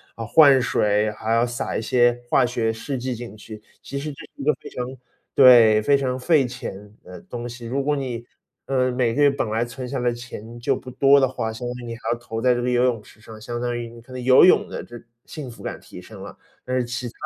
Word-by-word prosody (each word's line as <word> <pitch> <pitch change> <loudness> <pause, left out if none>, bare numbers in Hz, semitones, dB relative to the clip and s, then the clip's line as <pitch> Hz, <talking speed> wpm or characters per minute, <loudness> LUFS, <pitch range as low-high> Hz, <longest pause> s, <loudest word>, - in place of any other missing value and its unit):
啊， 115 - -6
换 140 +2 +6
水， 105 -3 +1
还 110 +1 -5
要 115 +1 +3
撒 120 -1 -3
一 - - -2
些 120 +1 +2
化 130 - +3
学 120 -2 0
试 130 +5 -5
剂 130 +1 -3
进 115 -3 -9
去。 110 0 -11 0.2
其 140 - -5
实 150 +1 -5
这 140 - -13
是 - - -24
一 - - -4
个 150 - +4
非 - - -13
常 125 - -4 0.5
对， 120 -5 +7
非 140 +5 +4
常 130 -2 -1
费 150 +1 +3
钱 105 -4 -8
的 90 -1 -11
东 120 0 -7
西。 120 0 -8
如 135 +4 -1
果 145 +1 +1
你， 125 -4 -4 0.4
呃， 130 -1 +1
每 125 -2 0
个 145 - 0
月 145 - +6
本 140 -4 -2
来 110 +2 +1
存 125 +2 -7
下 135 0 -3
来 120 0 +1
钱， 120 -1 -9
就 135 +3 0
不 125 - -9
多 135 +2 +5
的 135 - +4
话， 115 -3 -4
相 120 +2 -6
当 120 - -4
于 - - -8
你 115 -1 -6
还 - - -22
要 120 - 0
投 115 -1 -6
在 125 0 +3
这 120 - -2
个 - - -1
游 125 0 +2
泳 120 -4 0
池 110 - -19
上， 110 -1 -12
相 120 +2 -5
当 120 -1 -2
于 120 -1 -5
你 115 0 -13
可 120 - -18
能 130 0 -6
游 130 +1 +6
泳 185 - +5
的 - - -6
这 120 -1 -11 0.3
幸 145 -5 -8
福 115 - -13
感 - - -5
提 - - -12
升 - - -12
了。 - - -10 0.3
但 130 - -2
是 125 - +1
其 125 +1 -4
它 - - -8
120 Hz, 285 characters per minute, -23 LUFS, 115-130 Hz, 0.5 s, 对